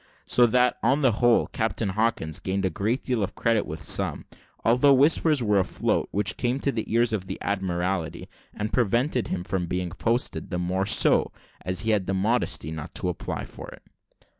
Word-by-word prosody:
So 120 -1 +4
that, 125 +1 +2
on 135 +5 +2
the 130 - +5
whole, 120 +2 +3
Captain 110 -1 -2
Hawkins 95 -6 -1
gained 95 +1 -2
a 95 - 0
great 110 - -1
deal 125 -4 -1
of 100 0 -3
credit 115 -2 +1
with 80 0 -6
some; - - +1 0.4
although 125 +4 +5
whispers 150 0 +3
were 105 -2 +3
afloat, 95 - -1
which 100 0 -1
came 125 +2 -1
to 140 - +1
the 110 -4 -4
ears 115 0 +2
of 95 -3 -3
the - - -5
Admiralty, 90 -3 -2 0.2
and 105 0 -5
prevented 125 +2 +1
him 90 -1 -3
from 90 -1 -2
being 90 0 -3
posted 115 +7 -1
the 90 - -2
more 90 +2 -1
so, - - +3 0.3
as 90 +1 -1
he 110 0 0
had 100 -4 0
the 95 - 0
modesty 100 -6 0
not 80 +1 -7
to 90 - -1
apply 90 - -4
for - - -10
it. - - -14
105 Hz, 190 wpm, -25 LUFS, 90-120 Hz, 0.4 s, the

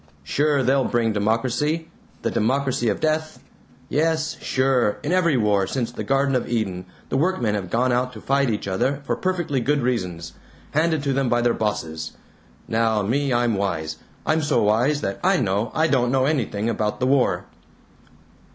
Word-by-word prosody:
Sure, 145 - +1
they'll 135 +2 +3
bring 115 -2 +1
democracy 125 +10 0 0.4
the - - 0
democracy 130 0 +1
of 100 - -1
death. 155 0 -1 0.5
Yes, 160 +1 0
sure, 130 -5 +1
in 150 - -2
every 170 -6 +3
war 105 -4 +2
since 120 0 -2
the - - -5
Garden 135 0 +1
of 125 - -1
Eden 95 -6 -2 0.2
the 135 - 0
workmen 140 - +1
have 100 -4 -3
gone 125 +5 +1
out 125 +1 +1
to 110 - -9
fight 140 +2 +1
each 105 -3 -2
other 135 +9 -1
for - - 0
perfectly 175 -7 -1
good 140 +2 +1
reasons 90 -10 -2 0.4
handed 155 -1 +1
to 140 -1 0
them 135 -2 +1
by 120 - +2
their 120 -1 +3
bosses. 80 -7 -3 0.5
Now 110 -2 +1
me, 135 +6 0
I'm 120 -1 +2
wise. 80 -6 -2 0.3
I'm 160 +1 +2
so 145 - +2
wise 120 +8 +2
that 95 -5 -3
I 190 +1 +4
know 105 - 0
I 160 - +3
don't 125 -6 +2
know 130 0 +2
anything 115 -8 -1
about 105 -2 -1
the 125 - +1
war." 135 0 +2
125 Hz, 175 wpm, -23 LUFS, 105-145 Hz, 0.5 s, I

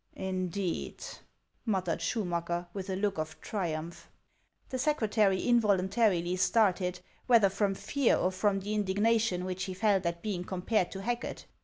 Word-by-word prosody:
" - - -41 0.2
Indeed! 185 0 -3 0.3
" - - -45
muttered 185 -6 0
Schumacker, 175 -2 -1
with 195 -1 -5
a 190 - -1
look 195 -2 -1
of 155 0 -4
triumph. 170 -4 -4 0.6
The 260 - -3
secretary 220 -9 +2
involuntarily 195 -5 +2
started, 185 -3 +2 0.3
whether 230 -5 +6
from 195 0 0
fear, 280 +5 +1
or 185 - +1
from 195 +1 +1
the 205 +2 -3
indignation 210 -1 +1
which 185 0 -3
he 185 - -5
felt 195 -2 +2
at 170 0 -3
being 195 -5 -2
compared 185 +1 0
to 195 - -6
Racket. 240 +4 -3
195 Hz, 150 wpm, -30 LUFS, 180-215 Hz, 0.6 s, whether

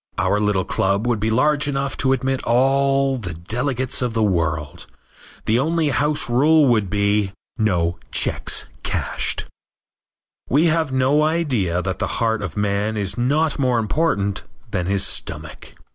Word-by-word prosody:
Our 105 - +1
little 105 -3 +1
club 100 +2 0
would 120 -3 0
be 110 +2 0
large 145 +5 +2
enough 140 -1 -2
to 130 - +1
admit 130 0 0
all 135 +2 +2
the 90 -7 -6
delegates 125 - -2
of 120 -2 -2
the 110 - +2
world. 85 -6 -1 0.6
The 115 +2 +2
only 160 +2 +1
house 150 +3 0
rule 150 +6 +4
would 110 -5 +2
be 100 0 +1 0.3
"No 85 -5 +1
checks - - 0 0.2
cashed." - - -1 1.0
We 150 +6 +3
have 160 -3 +1
no 130 +3 +2
idea 130 - 0
that 95 -2 -3
the - - -1
heart 115 -2 0
of 105 0 -5
man 105 +1 0
is 100 -2 -2
not 145 +6 +1
more 125 -3 +2
important 105 -5 0 0.3
than 90 -1 -1
his 100 0 +1
stomach. - - -6
120 Hz, 150 wpm, -21 LUFS, 100-140 Hz, 1.0 s, rule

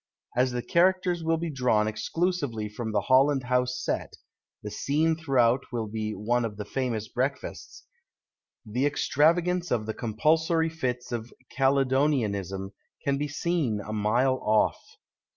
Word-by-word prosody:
As 125 +1 +2
the 120 -1 -3
characters 180 -1 +2
will 165 0 +1
be 165 0 -3
drawn 125 -6 +2
exclusively 140 -1 -1
from 110 +1 -5
the 105 - +1
Holland 135 +1 +3
House 125 0 0
set - - -3 0.5
(the 105 - -5
scene 155 +8 +1
throughout 135 -5 +2
will 115 -2 -2
be 110 0 -4
one 120 +5 0
of 105 -3 -4
the 105 - -5
famous 115 -3 -2
breakfasts), 130 +3 -4 0.8
the 125 +6 0
extravagance 170 +5 +2
of 115 -3 0
the 110 - -3
com 110 -2 -5
pulsory 160 +4 +2
fits 125 -6 -3
of 120 0 -4 0.2
Caledonianism 130 -8 +1 0.3
can 140 0 0
be 150 - -1
seen 145 -6 -1
a 105 +1 -6
mile 120 +5 +2
off. 110 0 +2
125 Hz, 145 wpm, -27 LUFS, 110-150 Hz, 0.8 s, Holland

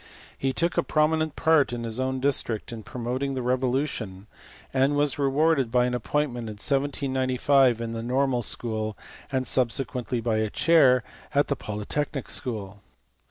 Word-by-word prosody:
He 135 - -1
took 170 +7 -1
a - - +5
prominent 155 -1 +1
part 160 -5 +3
in 120 -1 -4
his 115 +1 -3
own 130 0 -1
district 130 -6 0
in 115 - -7
promoting 125 +4 -3
the 130 - -3
Revolution, 125 -6 -1 0.5
and 135 +2 +2
was 145 0 +1
rewarded 140 -2 +2
by 125 0 +3
an 125 - -1
appoint 145 +4 0
ment 120 -2 -5
in - - -5
1795 135 0 +2
in 115 -1 -4
the 115 - -4
Normal 125 +1 +1
school, 110 -2 -2 0.3
and 130 -1 0
subsequently 125 -1 0
by 115 -1 0
a 110 0 0
chair 135 -4 +4 0.3
at 145 - +3
the 140 - +1
Polytechnic 130 +6 -3
school. 105 -6 -3
130 Hz, 160 wpm, -26 LUFS, 115-140 Hz, 0.5 s, a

